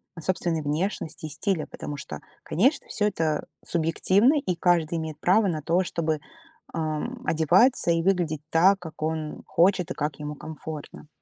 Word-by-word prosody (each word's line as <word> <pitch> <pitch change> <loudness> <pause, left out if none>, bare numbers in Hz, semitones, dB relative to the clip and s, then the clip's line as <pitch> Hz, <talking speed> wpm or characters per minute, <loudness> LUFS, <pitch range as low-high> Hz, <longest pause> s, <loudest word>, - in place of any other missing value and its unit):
о 165 - -8
собственной 165 -1 0
внешности 155 +2 -2
и - - -4
стиле, 165 +2 -1
потому 145 -1 -6
что, 75 - -7 0.2
конечно, 260 - +1
всё 210 - 0
это 160 -6 -1 0.2
субъективно, 190 - +3
и 185 -11 -2
каждый 170 -2 +2
имеет 155 -1 -5
право 195 +5 +4
на 155 -4 -1
то, 170 +4 +2
чтобы, 160 -3 -1 0.5
а, 155 -2 -1 0.2
одеваться 175 - +4
и 165 0 +1
выглядеть 175 -5 +1
так, 185 +5 +5
как 160 -4 -10
он 155 -1 -3
хочет 180 0 +3
и - - -3
как 150 -1 -3
ему 150 0 -5
комфортно. 155 0 -8
165 Hz, 160 wpm, -26 LUFS, 155-185 Hz, 0.5 s, так